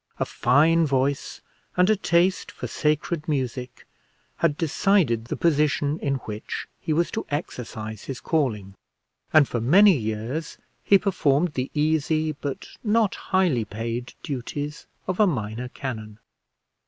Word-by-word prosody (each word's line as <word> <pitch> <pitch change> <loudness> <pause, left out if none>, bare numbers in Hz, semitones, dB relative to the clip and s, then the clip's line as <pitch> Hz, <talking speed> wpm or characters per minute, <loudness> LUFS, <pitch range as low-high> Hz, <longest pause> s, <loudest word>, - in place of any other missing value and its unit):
A - - +1
fine 155 +6 +3
voice 135 0 -1 0.4
and 180 0 +5
a 215 - +4
taste 185 -1 +1
for - - -7
sacred 155 +1 -1
music 130 -4 -3 0.5
had 150 -3 +1
decided 160 - +2
the - - -3
position 150 -2 +1
in 140 -1 0
which 105 0 -5
he - - -3
was 170 +3 +1
to 220 - -2
exercise 110 - -5
his 135 -2 -5
calling, 110 - -1 0.6
and 155 -3 +6
for 120 - -2
many 190 - +6
years 115 +6 -3 0.3
he 200 - +6
performed 170 -5 +1
the 130 0 -2
easy 155 +1 +1
but 140 -2 -5 0.2
not 215 -2 +2
highly 180 - +1
paid 115 +3 -5
duties 145 +2 -5 0.2
of 185 +1 -3
a 210 - +6
minor 120 - -3
canon. 110 -6 -6
145 Hz, 135 wpm, -25 LUFS, 125-165 Hz, 0.6 s, and